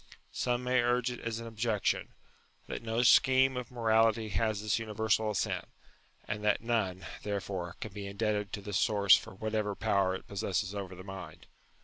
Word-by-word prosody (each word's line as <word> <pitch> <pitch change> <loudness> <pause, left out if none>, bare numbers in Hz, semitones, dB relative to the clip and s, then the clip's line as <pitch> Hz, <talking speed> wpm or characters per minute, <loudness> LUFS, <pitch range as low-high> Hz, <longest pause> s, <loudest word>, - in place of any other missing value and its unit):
Some 125 0 -1
may 125 0 +3
urge 120 +1 +1
it 120 - -6
as 115 -1 -3
an 115 - -7
objection, 110 -2 -1 0.5
that - - -5
no 115 +1 0
scheme 130 +1 +5
of 125 -1 -4
morality 115 -2 +2
has 110 0 0
this 110 +1 +1
universal 110 0 0
assent, 105 - -1 0.6
and 105 0 -3
that 105 - +3
none, 110 -6 -1 0.2
therefore, 95 -4 -4
can 110 - -6
be 100 -1 -6
indebted 105 0 -1
to 105 - -3
this 100 -1 -1
source 100 -3 +6
for - - -5
whatever 110 0 -2
power 100 -3 +1
it - - -8
possesses 95 -1 -2
over 95 -2 -5
the 90 - -10
mind. 95 0 -9
110 Hz, 170 wpm, -31 LUFS, 100-115 Hz, 0.6 s, source